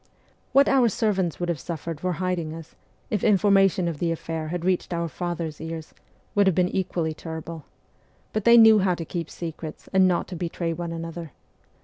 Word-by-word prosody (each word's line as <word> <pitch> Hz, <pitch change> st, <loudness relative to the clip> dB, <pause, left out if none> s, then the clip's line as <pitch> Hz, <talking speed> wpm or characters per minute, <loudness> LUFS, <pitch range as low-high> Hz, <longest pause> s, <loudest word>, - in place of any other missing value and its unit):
What 275 Hz, +1 st, +5 dB
our 260 Hz, -4 st, +4 dB
servants 190 Hz, -5 st, 0 dB
would 175 Hz, -, -2 dB
have 170 Hz, -4 st, -1 dB
suffered 165 Hz, -1 st, -5 dB
for 185 Hz, +1 st, -1 dB
hiding 170 Hz, -2 st, -2 dB
us, 165 Hz, -1 st, -11 dB, 0.4 s
if 210 Hz, -, 0 dB
information 195 Hz, -3 st, +4 dB
of 165 Hz, -4 st, -3 dB
the 170 Hz, -1 st, 0 dB
affair 160 Hz, -1 st, -4 dB
had 175 Hz, +1 st, -4 dB
reached 185 Hz, -1 st, 0 dB
our 170 Hz, 0 st, -1 dB
father's 165 Hz, -2 st, -4 dB
ears, 160 Hz, -1 st, -6 dB, 0.4 s
would 200 Hz, -1 st, +4 dB
have 190 Hz, -, +3 dB
been 180 Hz, 0 st, +2 dB
equally 175 Hz, -4 st, -1 dB
terrible; 160 Hz, -1 st, -7 dB, 0.7 s
but 215 Hz, -, -1 dB
they 235 Hz, +2 st, +7 dB
knew 220 Hz, -2 st, +8 dB
how 185 Hz, -2 st, +2 dB
to 165 Hz, -, -6 dB
keep 170 Hz, 0 st, -4 dB
secrets 160 Hz, -2 st, -7 dB
and 190 Hz, -1 st, +5 dB
not 180 Hz, -1 st, 0 dB
to 185 Hz, -, -6 dB
betray 170 Hz, 0 st, -3 dB
one 170 Hz, 0 st, -5 dB
another. 165 Hz, -2 st, -6 dB
175 Hz, 190 wpm, -25 LUFS, 165-190 Hz, 0.7 s, knew